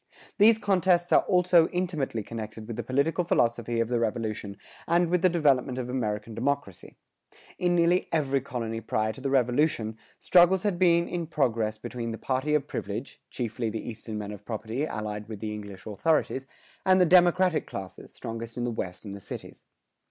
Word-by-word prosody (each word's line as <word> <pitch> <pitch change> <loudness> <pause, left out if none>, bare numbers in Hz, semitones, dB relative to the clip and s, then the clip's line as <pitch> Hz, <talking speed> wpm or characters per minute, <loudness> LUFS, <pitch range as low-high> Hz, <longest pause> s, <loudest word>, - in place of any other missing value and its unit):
These 220 +2 +7
contests 185 -4 +2
are - - +6
also 180 -3 +5
intimately 160 - -2
connected 110 0 -7
with 115 0 -6
the - - -3
political 145 +7 0
philosophy 120 -6 +1
of 115 - +1
the 120 0 0
Revolution 110 -3 -3 0.3
and 170 0 +2
with 180 -1 +2
the 185 - +5
development 140 -6 +2
of 125 -1 -4
American 110 -3 -2
democracy. 125 -4 -3 0.6
In 175 -1 +2
nearly 175 +1 +3
every 140 -4 +1
colony 115 -4 -4
prior 110 0 -1
to 135 - -11
the 135 - -1
Revolution, 125 -3 +1 0.2
struggles 180 +1 +5
had 200 -5 0
been 170 -2 +4
in 170 -2 -3
progress 115 -8 0
between 115 0 -5
the 115 - -4
party 135 +5 0
of 145 -2 +1
privilege, 105 +3 -5
chiefly 120 -1 -3
the 110 0 -5
Eastern 110 -1 -6
men 105 -1 -5
of 105 -1 -9
property 115 +6 -3
allied 105 -3 -5
with 110 -3 -6
the 105 0 -4
English 100 -2 -9
authorities, 135 +3 0 0.4
and 190 -1 +4
the 180 - +6
democratic 180 0 +4
classes, 95 -1 -8
strongest 115 +1 -7
in 120 - -2
the 120 - -1
West 95 -3 -5
and 100 -1 -6
the 100 - -10
cities. - - -9
125 Hz, 180 wpm, -27 LUFS, 110-170 Hz, 0.6 s, These